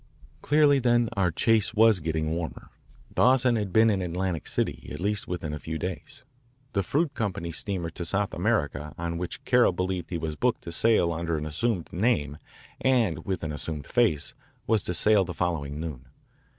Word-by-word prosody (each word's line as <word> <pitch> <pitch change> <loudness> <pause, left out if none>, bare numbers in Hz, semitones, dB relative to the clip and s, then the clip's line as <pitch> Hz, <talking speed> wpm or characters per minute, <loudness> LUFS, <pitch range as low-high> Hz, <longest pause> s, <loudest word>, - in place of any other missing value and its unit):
Clearly, 145 -1 +4
then, 120 -2 +3
our 95 -3 +2
chase 110 +6 +1
was 110 -2 +5
getting 80 -1 -2
warmer. 80 0 -5 0.4
Dawson 125 -1 +4
had 105 -4 -2
been 110 +3 +5
in 100 -2 0
Atlantic 90 -2 -2
City - - -2
at 75 - -6
least 100 +2 -2
within 85 -4 -4
a 75 - -4
few 80 +1 -4
days. 90 - -6 0.5
The 100 - +2
fruit 145 - 0
company 90 -8 -3
steamer 85 -1 -3
to 85 - -5
South 100 +4 -1
America 75 -7 -1
on 85 0 -3
which 90 - -6
Carroll 125 -6 +4
believed 90 -1 -2
he 85 - -2
was 80 -2 -4
booked - - 0
to 85 - -6
sail 85 -2 +3
under 85 0 -2
an 75 - -4
assumed 90 +4 -2
name 85 - 0 0.4
and 110 - +1
with 95 -3 -2
an 80 - -2
assumed 75 -1 -5
face 110 -11 +1 0.3
was 110 -2 +2
to 90 - -1
sail 105 0 +5
the 90 -2 -6
following 75 -5 -2
noon. 75 -6 -6
90 Hz, 180 wpm, -27 LUFS, 80-110 Hz, 0.5 s, was